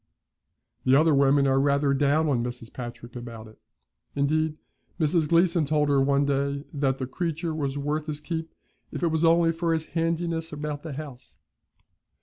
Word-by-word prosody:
The 130 +1 +4
other 155 +2 +5
women 140 0 +4
are 135 0 +3
rather 140 0 +2
down 145 +3 +2
on 125 -5 +1
Mrs. 120 -1 -6
Patrick 120 -1 -8
about 115 -2 -8
it; 110 - -17 0.6
indeed, 155 +2 +1 0.4
Mrs. 155 -1 +2
Gleeson 170 0 +3
told 150 0 +2
her 140 -1 +3
one 140 +1 +2
day 140 0 -1
that 135 -2 0
the 130 - -3
creature 165 +3 -3
was 145 -3 -2
worth 150 +2 -2
his 150 -1 -3
keep 160 +1 -5 0.4
if - - -5
it 170 - +3
was 160 0 0
only 165 0 +4
for 165 0 -1
his 160 -1 -1
handiness 165 0 -1
about 150 -1 -4
the 155 -2 -6
house. 135 -3 -9
145 Hz, 170 wpm, -26 LUFS, 135-160 Hz, 0.6 s, other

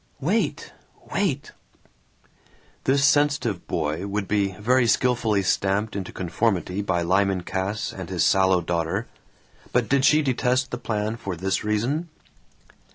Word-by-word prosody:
"Wait! 185 +11 -1 0.4
Wait!" 155 -9 -1 1.3
This 140 +1 +3
sensitive 140 -10 +2
boy 80 +4 -2
would 100 0 -2
be 100 -2 +1
very 120 +5 +2
skilfully 115 -5 +2
stamped 100 +3 0
into 95 -3 -4
conformity 95 +1 -1
by 90 -4 0
Lyman 95 +1 +1
Cass 95 +3 -3
and - - -7
his - - +1
sallow 95 -1 +4
daughter; 85 -1 -1 0.7
but 125 -2 +1
did 135 +3 +2
she 150 +3 +5
detest 130 0 +1
the 125 - -4
plan 110 0 -2
for 100 -5 -5
this 95 +3 -1
reason? 120 +11 -1
105 Hz, 130 wpm, -24 LUFS, 95-130 Hz, 1.3 s, she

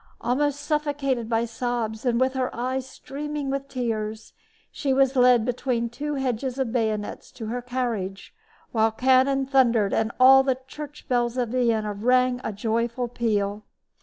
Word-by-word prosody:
Almost 285 +4 0
suffocated 285 -6 -1
by 230 0 +1
sobs 230 -1 -3
and 235 -1 +2
with 260 0 +2
her 260 -1 -1
eyes 255 +2 -2
streaming 290 0 -5
with 275 0 -3
tears, 220 -4 -4 0.4
she 275 -2 -1
was 270 0 +3
led 250 -3 +5
between 245 -1 -1
two 290 +5 -4
hedges 260 -1 -2
of 260 -4 -1
bayonets 220 -3 -2
to 225 - -7
her 240 +3 -3
carriage, 235 -6 -3 0.4
while 220 -1 +3
cannon 260 +3 +3
thundered 240 -6 +3
and 225 0 +1
all 265 +1 +8
the 265 -1 0
church 295 +1 -9
bells 240 -2 0
of 245 -2 0
Vienna 225 -4 +1
rang 250 +4 +2
a - - -2
joyful 230 +4 -1
peal. 210 -3 -1
245 Hz, 155 wpm, -25 LUFS, 225-265 Hz, 0.4 s, all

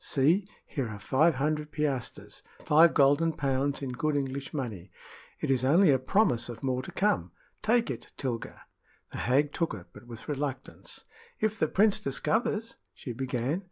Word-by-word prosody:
See! 165 +9 +2 0.2
here 135 -6 -3
are 105 - -6
five 150 +9 +3
hundred 150 +2 -1
piastres 145 -5 -3 0.2
five 160 +2 +6
golden 145 +3 +4
pounds 140 0 -1
in 130 - -3
good 150 +3 0
English 140 0 -3
money. 110 - -5 0.5
It - - -1
is 130 -2 +2
only 160 +5 +5
a 130 - +3
promise 130 - +2
of 115 +1 -8
more 130 -1 0
to - - -9
come. 90 - +1 0.3
Take 230 +1 +2
it, - - -8
Tilga." 120 -4 -4 0.5
The - - -6
hag 140 +4 +2
took 165 -8 -1
it, 90 -4 -10
but 120 - -14
with 115 -2 -10
reluctance. 140 -3 -5 0.3
"If 220 0 0
the - - +3
prince 205 +1 +3
discovers 220 - -1
" - - -37
she 125 - -6
began. 130 +5 -1
140 Hz, 170 wpm, -29 LUFS, 130-160 Hz, 0.5 s, five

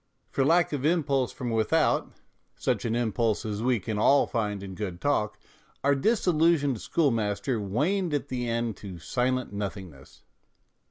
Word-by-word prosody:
For 135 - +1
lack 165 +3 +3
of 140 -3 -2
impulse 145 -5 +1
from 120 -2 -4
without, 110 -1 +1 0.4
such - - -1
an 115 0 0
impulse 115 -1 0
as 105 -1 -3
we 125 -1 +2
can 105 +2 -3
all 140 +6 +5
find 105 -4 -2
in 95 -1 -7
good 90 -3 -5
talk, 105 -6 0 0.5
our 140 +1 +4
disillusioned 160 - +2
schoolmaster 115 -5 0
waned 155 - 0
at 145 0 -3
the 125 -2 -2
end 115 -2 -1
to 95 -4 -8
silent 125 +6 -1
nothingness. 95 -8 -7
120 Hz, 150 wpm, -27 LUFS, 105-140 Hz, 0.5 s, all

